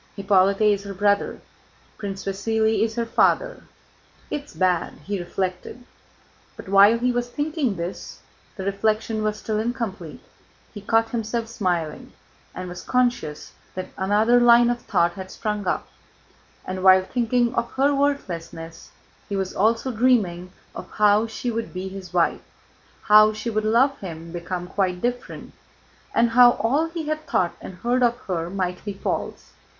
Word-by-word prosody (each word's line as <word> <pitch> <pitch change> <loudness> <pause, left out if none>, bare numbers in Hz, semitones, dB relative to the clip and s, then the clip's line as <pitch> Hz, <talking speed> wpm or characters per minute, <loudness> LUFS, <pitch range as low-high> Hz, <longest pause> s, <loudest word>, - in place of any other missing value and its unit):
Hippolyte 195 0 +2
is 205 -2 +3
her 200 -1 -6
brother... 200 +1 +1 0.6
Prince 195 -2 -5
Vasíli 220 +3 0
is 225 0 0
her 235 -1 -1
father... 230 - +1 0.7
It's 290 0 -5
bad...." 180 -2 +1
he 200 +1 -3
reflected, 185 +6 -4 0.7
but - - -10
while 200 +4 +6
he 250 +2 +1
was 245 0 -2
thinking 290 - -1
this 170 +2 -6 0.4
(the 190 - -6
reflection 215 +2 0
was 215 0 -1
still 215 0 -2
incomplete), 220 -8 -4 0.5
he 205 - -8
caught 225 +2 +1
himself 230 0 -2
smiling 180 -9 -3 0.4
and 185 - -5
was 175 0 -7
conscious 245 -12 -1 0.2
that 185 0 -5
another 210 +5 +3
line 240 0 +6
of 240 0 -4
thought 170 0 +1
had 185 +1 -8
sprung 210 -1 -4
up, - - -1 0.8
and 185 0 -4
while 190 0 +7
thinking 240 +2 0
of 235 - -2
her 280 +2 +2
worthlessness 170 -13 -3 0.4
he 200 - -2
was 190 -1 -2
also 230 +5 +1
dreaming 210 -7 +1 0.2
of - - -8
how 210 +1 +3
she 235 +2 -4
would 225 -4 -4
be 185 +1 -4
his 190 -1 -9
wife, 175 -2 +1 0.6
how 215 +1 +6
she 230 +2 -4
would 215 0 -1
love 260 +5 +3
him 165 -3 -8
become 175 +1 -4
quite 180 -1 -1
different, 245 +4 -4 0.6
and 230 0 +3
how 245 0 +7
all 275 +10 +1
he 325 -2 -5
had 310 0 -3
thought 180 - +1
and 185 - -9
heard 240 +7 0
of 240 -1 +3
her 170 -3 -3
might 180 -1 -3
be 205 - -4
false. 195 - -4
210 Hz, 155 wpm, -23 LUFS, 185-240 Hz, 0.8 s, while